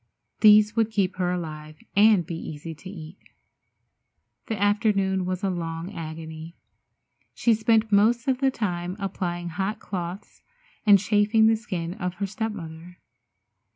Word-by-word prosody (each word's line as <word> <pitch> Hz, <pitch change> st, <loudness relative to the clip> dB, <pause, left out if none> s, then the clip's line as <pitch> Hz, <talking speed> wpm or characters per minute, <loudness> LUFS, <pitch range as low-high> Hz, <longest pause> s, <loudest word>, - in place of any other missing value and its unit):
These 210 Hz, 0 st, +6 dB
would 225 Hz, -2 st, +2 dB
keep 195 Hz, -4 st, -1 dB
her 180 Hz, -1 st, 0 dB
alive 155 Hz, -3 st, -6 dB, 0.2 s
and 205 Hz, -3 st, +5 dB
be 170 Hz, -, -6 dB
easy 160 Hz, 0 st, -7 dB
to 170 Hz, +4 st, -11 dB
eat. 170 Hz, -1 st, -10 dB, 1.3 s
The 220 Hz, -4 st, -3 dB
afternoon 200 Hz, -3 st, +1 dB
was 185 Hz, +1 st, -3 dB
a 195 Hz, -, +1 dB
long 165 Hz, +1 st, -5 dB
agony. 160 Hz, -1 st, -8 dB, 0.8 s
She 235 Hz, -, +3 dB
spent 220 Hz, 0 st, +2 dB
most 225 Hz, +5 st, +3 dB
of 260 Hz, -1 st, +1 dB
the 270 Hz, -1 st, +3 dB
time 180 Hz, -7 st, -3 dB
applying 175 Hz, -3 st, -3 dB
hot 195 Hz, +5 st, -2 dB
cloths, 180 Hz, -1 st, -6 dB, 0.5 s
and 205 Hz, -1 st, +9 dB
chafing 210 Hz, +3 st, +3 dB
the 225 Hz, 0 st, +5 dB
skin 180 Hz, -7 st, -4 dB
of 180 Hz, -3 st, -4 dB
her 200 Hz, -, -2 dB
step 220 Hz, +3 st, -3 dB
mother. 165 Hz, -1 st, -9 dB
190 Hz, 145 wpm, -25 LUFS, 170-215 Hz, 1.3 s, and